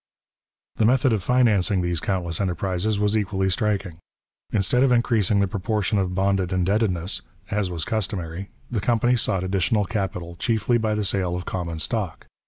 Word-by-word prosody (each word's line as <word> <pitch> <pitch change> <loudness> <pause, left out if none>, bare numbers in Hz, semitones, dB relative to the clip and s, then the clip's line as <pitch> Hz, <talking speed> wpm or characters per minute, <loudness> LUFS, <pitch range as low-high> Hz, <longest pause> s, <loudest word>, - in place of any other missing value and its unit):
The 110 - +3
method 125 +1 +4
of 105 - 0
financing 105 -5 +3
these 85 -1 0
countless 85 -3 -2
enterprises 95 +3 -1
was 105 +1 +1
equally 95 -2 0
striking. 100 -4 -1 0.5
Instead 105 +5 +2
of 135 -1 +4
increasing 110 -4 +3
the 100 - +2
proportion 105 +1 -1
of 90 -1 -1
bonded 95 -1 +1
indebtedness, 95 -1 0 0.3
as 105 -2 0
was 85 -3 -3
customary, 95 -4 -3 0.2
the 110 -4 -1
company 120 +3 +2
sought 95 -5 0
additional 100 +3 +1
capital 90 -4 -4
chiefly 120 +2 +1
by 110 -1 0
the 105 -1 -1
sale 95 -2 0
of 90 - -5
common 85 -3 -3
stock. 80 - -3
100 Hz, 160 wpm, -24 LUFS, 90-110 Hz, 0.5 s, method